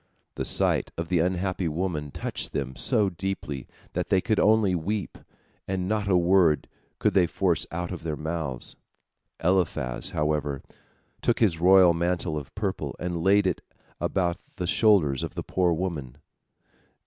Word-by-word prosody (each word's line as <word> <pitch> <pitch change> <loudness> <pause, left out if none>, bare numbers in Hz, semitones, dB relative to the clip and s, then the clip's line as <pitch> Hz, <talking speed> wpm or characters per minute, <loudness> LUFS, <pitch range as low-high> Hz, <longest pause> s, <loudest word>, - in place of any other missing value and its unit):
The - - -3
sight - - +2
of 85 0 -4
the 90 -2 +2
unhappy 90 +1 0
woman 80 -2 -2
touched - - -4
them 65 -2 -3
so 100 - +2
deeply 85 -7 -4 0.3
that - - -2
they 95 - +4
could 110 +3 0
only 110 -3 +4
weep, 95 +2 -2 0.5
and 95 -1 -2
not 105 0 0
a 95 -2 +4
word 90 -3 +3 0.3
could - - +1
they 90 -3 +4
force 90 -1 0
out 85 +2 -3
of 90 - -5
their 80 -2 -3
mouths. 75 -5 -3 0.7
Eliphaz, 85 -9 0
however, 75 -2 -1 0.6
took 120 - +2
his 95 -8 +2
royal 90 -1 +7
mantle 85 -1 -1
of 75 -3 -7
purple, - - -3
and 85 -1 -3
laid 100 +3 +4
it 90 - 0 0.4
about 90 -2 0 0.2
the 90 - -3
shoulders 90 - +3
of - - -5
the - - -3
poor 90 -2 +1
woman. 80 -7 -3
90 Hz, 155 wpm, -26 LUFS, 75-95 Hz, 0.7 s, royal